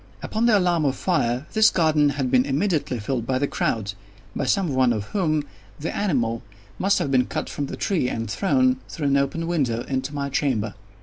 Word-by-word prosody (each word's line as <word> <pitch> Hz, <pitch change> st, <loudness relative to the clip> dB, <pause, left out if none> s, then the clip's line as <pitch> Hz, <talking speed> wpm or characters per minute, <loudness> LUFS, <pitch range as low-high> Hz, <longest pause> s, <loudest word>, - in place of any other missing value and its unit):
Upon 225 Hz, +2 st, 0 dB
the 220 Hz, -3 st, +5 dB
alarm 175 Hz, -4 st, +2 dB
of 135 Hz, -, +1 dB
fire, 130 Hz, -7 st, 0 dB
this 220 Hz, 0 st, +6 dB
garden 155 Hz, -4 st, +3 dB
had 130 Hz, -3 st, -1 dB
been 125 Hz, -1 st, +5 dB
immediately 145 Hz, -1 st, 0 dB
filled 115 Hz, +1 st, -3 dB
by 130 Hz, -, +1 dB
the 140 Hz, -, +1 dB
crowd—by 100 Hz, +1 st, -4 dB
some 170 Hz, +2 st, +1 dB
one 130 Hz, -2 st, +3 dB
of 105 Hz, -3 st, -2 dB
whom 155 Hz, -7 st, 0 dB, 0.4 s
the 155 Hz, -, -4 dB
animal 120 Hz, -, 0 dB, 0.4 s
must 200 Hz, +2 st, +3 dB
have 140 Hz, -, -1 dB
been 125 Hz, -2 st, +3 dB
cut -, -, -4 dB
from 145 Hz, -, -3 dB
the -, -, -6 dB
tree 165 Hz, -11 st, 0 dB
and 115 Hz, -2 st, -3 dB
thrown, 255 Hz, -, +2 dB
through 145 Hz, -4 st, -2 dB
an 140 Hz, -, +3 dB
open 140 Hz, +4 st, -1 dB
window, 135 Hz, -9 st, 0 dB
into 135 Hz, +2 st, -3 dB
my 140 Hz, -1 st, -2 dB
chamber. 120 Hz, -7 st, 0 dB
140 Hz, 195 wpm, -23 LUFS, 125-170 Hz, 0.4 s, this